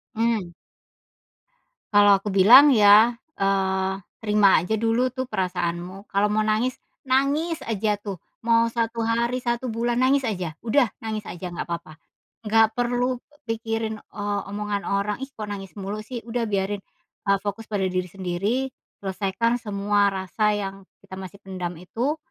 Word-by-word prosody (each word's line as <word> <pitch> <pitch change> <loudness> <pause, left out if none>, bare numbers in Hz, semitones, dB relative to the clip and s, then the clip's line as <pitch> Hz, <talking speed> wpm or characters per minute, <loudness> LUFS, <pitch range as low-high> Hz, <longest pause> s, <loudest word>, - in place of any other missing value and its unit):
Mmm. 220 -6 0 1.4
Kalau 205 -1 +7
aku 200 0 -5
bilang 245 +9 +8
ya, 215 +2 +7 0.2
eee, 190 -1 +1 0.2
terima 210 -2 +4
aja 185 +5 -1
dulu 235 +3 +1
tuh 260 -1 -4
perasaanmu 185 -1 -3
kalau 200 +1 +2
mau 215 - +2
nangis 220 +4 +1 0.3
nangis 285 +5 +1
aja 210 -1 -1
tuh 200 -3 -5 0.2
mau 230 0 +4
1 230 0 -1
hari 235 +2 +1
1 240 +1 -1
bulan 235 +2 -1
nangis 270 +1 +3
aja 180 -8 -3
udah 240 +1 +3 0.2
nangis 215 -1 -2
aja 180 0 -6
gapapa, 170 -2 -6 0.4
nggak 220 0 +3
perlu 245 +1 0 0.2
pikirin, 225 -1 -3
eee, 205 -1 -3
omongan 205 0 -3
orang, 200 +3 -1
ih, 270 - -5
kok 215 - -4
nangis 200 -1 -7
mulu 200 +2 -4
sih? 245 +3 -7
Udah 230 -1 -2
biarin, 200 0 -1 0.5
eee, 200 - +5
fokus 210 +3 -4
pada 200 -2 0
diri 185 -1 -2
sendiri 200 +9 -2 0.2
selesaikan 200 +5 -1
semua 205 -1 +1
rasa 195 +3 -1
yang 195 -1 -6 0.2
kita - - -13
masih 190 +1 -8
pendam 180 -3 -5
itu, 240 - -2
210 Hz, 145 wpm, -24 LUFS, 195-230 Hz, 1.4 s, bilang